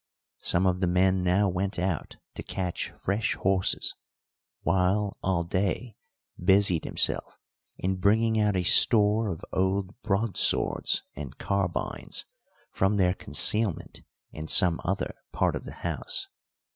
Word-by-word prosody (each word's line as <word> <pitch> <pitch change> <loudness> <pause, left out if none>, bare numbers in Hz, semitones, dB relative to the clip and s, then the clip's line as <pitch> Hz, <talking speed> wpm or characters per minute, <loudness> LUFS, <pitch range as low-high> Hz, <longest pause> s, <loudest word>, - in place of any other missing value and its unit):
Some 90 +2 +1
of 90 -1 +1
the 90 - +2
men 95 +1 +2
now 90 +3 +2
went 95 +2 -2
out 90 -3 -3 0.2
to - - -7
catch 90 -3 -4
fresh 100 +4 -1
horses, 95 -1 0 0.7
while 95 +2 +1
Alday 95 +5 -1 0.5
busied 95 -3 +4
himself - - -1 0.4
in 95 +1 -2
bringing 110 +3 +2
out 105 -2 +1
a 90 - 0
store 105 +3 +4
of 85 -4 -6
old 95 +1 0
broadswords 105 0 +1
and 70 -2 -8
carbines 95 -4 -2 0.5
from 95 +2 +1
their 90 -2 +3
concealment 105 0 +1 0.3
in 75 0 -7
some 85 -1 +5
other - - -2 0.2
part - - 0
of - - -6
the - - -9
house. - - -2
95 Hz, 125 wpm, -27 LUFS, 90-100 Hz, 0.7 s, some